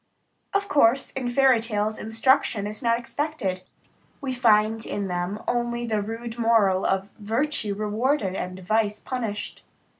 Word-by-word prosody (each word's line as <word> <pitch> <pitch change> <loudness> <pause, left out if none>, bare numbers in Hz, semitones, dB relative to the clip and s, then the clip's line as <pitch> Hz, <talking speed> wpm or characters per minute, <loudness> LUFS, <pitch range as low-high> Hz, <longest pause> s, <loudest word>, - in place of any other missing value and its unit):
Of 400 0 0
course, 270 - +3
in 255 -2 -3
fairy 260 -1 +4
tales, 215 -1 -2
instruction 225 -1 +2
is 210 +1 -5
not 230 -2 +2
expected; 240 -7 -3 0.6
we 270 -2 -3
find 220 -2 +3
in 200 -3 -3
them 180 +3 -3
only 240 0 -1
the 215 -2 0
rude 225 +2 -6
moral 215 -5 +3
of 195 +1 -1
virtue 225 0 -1
rewarded 215 +1 0
and 185 -1 -4
vice 210 +2 0
punished. 225 -5 -4
225 Hz, 140 wpm, -25 LUFS, 205-245 Hz, 0.6 s, fairy